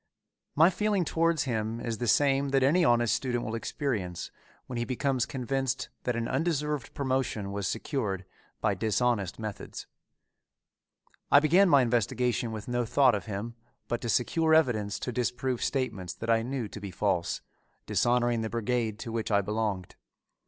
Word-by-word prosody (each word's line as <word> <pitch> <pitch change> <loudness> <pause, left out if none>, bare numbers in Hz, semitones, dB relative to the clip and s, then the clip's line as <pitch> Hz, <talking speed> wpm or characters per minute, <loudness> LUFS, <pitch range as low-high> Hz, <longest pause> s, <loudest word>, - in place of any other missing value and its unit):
My 160 +5 +6
feeling 205 -3 +1
towards 165 -2 +1
him 115 -2 -2
is 115 -2 -3
the 120 - -1
same 140 +2 +3
that 135 -1 +3
any 165 +7 +4
honest 120 -6 +3
student 120 -2 -1
will 110 - -4
experience 115 - -3 0.3
when 125 - -6
he 120 - 0
becomes 130 0 0
convinced 135 0 -2 0.2
that 125 - 0
an 115 0 -1
undeserved 150 -5 -1
promotion 130 -7 -1
was 100 -2 -2
secured 105 -6 -2 0.4
by 110 -2 +2
dishonest 110 0 0
methods. 110 -2 -6 1.4
I 140 - +8
began 175 +6 +5
my 140 -5 +6
investigation 120 -1 0
with 110 -2 -6
no 120 0 0
thought 130 +2 +4
of 100 -4 -3
him 105 +3 -4 0.3
but 120 - -2
to 120 - -3
secure 160 +8 +3
evidence 110 -10 +2
to 125 - -4
disprove 125 +1 -1
statements 100 -10 -2
that 115 0 -2
I 115 0 +4
knew 125 -1 -3
to 105 - -9
be 100 - -5
false, 90 -2 -1 0.4
dishonoring 120 -1 +2
the 110 - -2
brigade 115 -1 -1
to 115 - -5
which 115 -1 -2
I 100 -2 +3
belonged. 105 -3 -3
120 Hz, 160 wpm, -29 LUFS, 110-135 Hz, 1.4 s, I